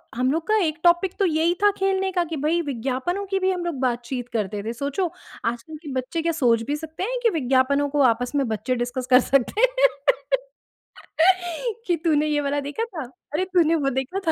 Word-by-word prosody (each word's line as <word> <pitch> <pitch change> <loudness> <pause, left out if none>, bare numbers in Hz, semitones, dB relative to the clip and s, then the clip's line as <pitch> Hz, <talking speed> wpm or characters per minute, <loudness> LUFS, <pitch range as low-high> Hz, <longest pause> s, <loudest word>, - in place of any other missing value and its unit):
हम 255 +2 +1
लोग 325 +4 -2
का 435 0 +3
1 310 +1 -2
टॉपिक 350 +2 +4
तो 395 - +3
यही 330 +1 +2
था 410 - +6
खेलने 385 0 +1
का 355 -1 +1
कि 315 - -2
भई 340 +2 +2
विज्ञापनों 265 - -2
की 385 - +3
भी 375 0 +2
हम 355 -1 -3
लोग 315 -7 -3
बातचीत 245 0 -2
करते 205 -2 -2
थे। 225 +2 -3
सोचो 285 +8 -2 0.3
आजकल 240 +7 -3
के 290 - -6
बच्चे 320 +6 -3
क्या 335 - +1
सोच 230 -3 +3
भी - - +1
सकते 320 +3 -6
हैं - - -2
कि 460 - +5
विज्ञापनों 270 +2 +2
को 290 0 +1
आपस 245 +4 -5
में 275 -3 +1
बच्चे 230 +3 -1
डिस्कस 245 +1 -3
कर 250 - +9
सकते 275 - +2 1.5
हैं 365 +6 +1
कि 350 -2 +2
तूने 305 -2 +3
ये 300 -1 +1
वाला 285 0 -1
देखा 290 +11 -3
था? 350 - -6 0.3
अरे 325 +5 +1
तूने 350 -3 +3
वो 285 -4 +1
देखा 365 +9 -5
305 Hz, 205 wpm, -23 LUFS, 255-355 Hz, 1.5 s, कर